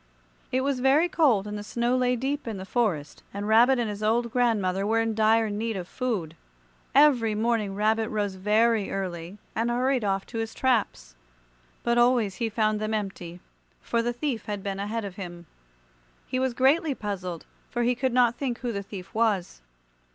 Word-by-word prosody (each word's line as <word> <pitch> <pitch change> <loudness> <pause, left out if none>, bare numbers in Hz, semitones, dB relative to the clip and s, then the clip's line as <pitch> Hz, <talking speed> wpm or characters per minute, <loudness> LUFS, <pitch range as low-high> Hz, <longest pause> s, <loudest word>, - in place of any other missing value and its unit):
It 260 - +1
was 275 -1 0
very 275 +6 +4
cold 260 - +3
and 210 0 -5
the 205 - -4
snow 240 +3 0
lay 250 -1 +2
deep 270 +3 -3
in 220 -3 -3
the 190 - -7
forest, 195 - -1
and 205 +1 -3
Rabbit 240 +4 +5
and 240 -2 0
his 205 0 -5
old 230 +2 +1
grandmother 205 -6 +1
were 225 +3 +2
in 225 0 0
dire 220 +1 +3
need 220 +1 -2
of 180 -2 -5
food. 200 -12 -3 0.6
Every 255 -7 +5
morning 215 -3 0
Rabbit 220 +2 +1
rose 205 -2 -1
very 210 +2 +2
early 180 -1 -4 0.2
and 230 +2 0
hurried 250 +1 +1
off 195 -1 0
to 230 - -6
his 225 0 -4
traps, 210 - 0 0.7
but 235 0 +2
always 240 -5 +3
he 230 -2 -1
found 215 -1 +1
them 215 +1 -1
empty, 180 -4 -5 0.4
for 235 - -1
the 240 +1 -1
thief 240 -2 -3
had 205 -2 -4
been 195 -1 -3
ahead 215 +2 -3
of 195 -2 -8
him. 175 -3 -8 0.8
He 255 - -2
was 260 -2 0
greatly 280 +3 +3
puzzled, 185 -6 -5 0.2
for 240 -1 -1
he 245 +1 +3
could 260 +1 -1
not 245 -1 +4
think 250 -2 -3
who 245 -2 -2
the 200 -2 -3
thief 195 -2 -9
was. 210 - 0
225 Hz, 190 wpm, -26 LUFS, 200-245 Hz, 0.8 s, Rabbit